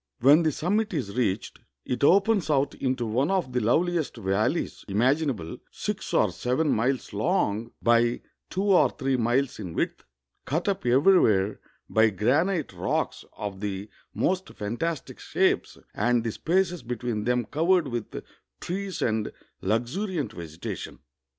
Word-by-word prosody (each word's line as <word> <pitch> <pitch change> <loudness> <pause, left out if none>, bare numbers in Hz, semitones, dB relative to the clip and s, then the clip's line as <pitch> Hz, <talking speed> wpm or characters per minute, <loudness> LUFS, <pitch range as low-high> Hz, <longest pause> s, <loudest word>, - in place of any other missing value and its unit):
When 145 +6 +6
the 160 -2 +2
summit 200 +7 0
is 115 -9 -3
reached, 110 -5 -1 0.3
it 125 +1 -2
opens 195 +3 +4
out 140 -1 +2
into 130 -2 -1
one 125 +7 +1
of 185 -10 0
the 125 - +2
loveliest 160 +7 +1
valleys 110 - -1
imaginable, 120 - 0
sLx - - -4
or - - +3
seven 140 +5 0
miles 125 +1 0
long, 115 - 0
by 120 0 +3 0.3
two 190 - -2
or 195 -3 +5
three 135 -2 -1
miles 125 +3 +1
in 90 -6 -6
width, - - -2 0.4
cut 160 +8 -1
up 195 -9 -1
everywhere 120 - +4 0.3
by 110 0 +4
granite 145 - +1
rocks - - -2
of 100 -2 -5
the 100 0 -4 0.2
most 185 0 0
fantastic 120 +10 -3
shapes, - - 0 0.2
and 120 -1 +1
the 115 - -1
spaces 175 - 0
between 120 -3 -3
them 125 -1 +1
covered 165 +3 +2
with 120 -4 -5 0.4
trees 190 +1 -3
and 110 -2 0 0.3
luxuriant 125 - -1
vegetation. 85 -4 -7
125 Hz, 140 wpm, -26 LUFS, 110-170 Hz, 0.4 s, When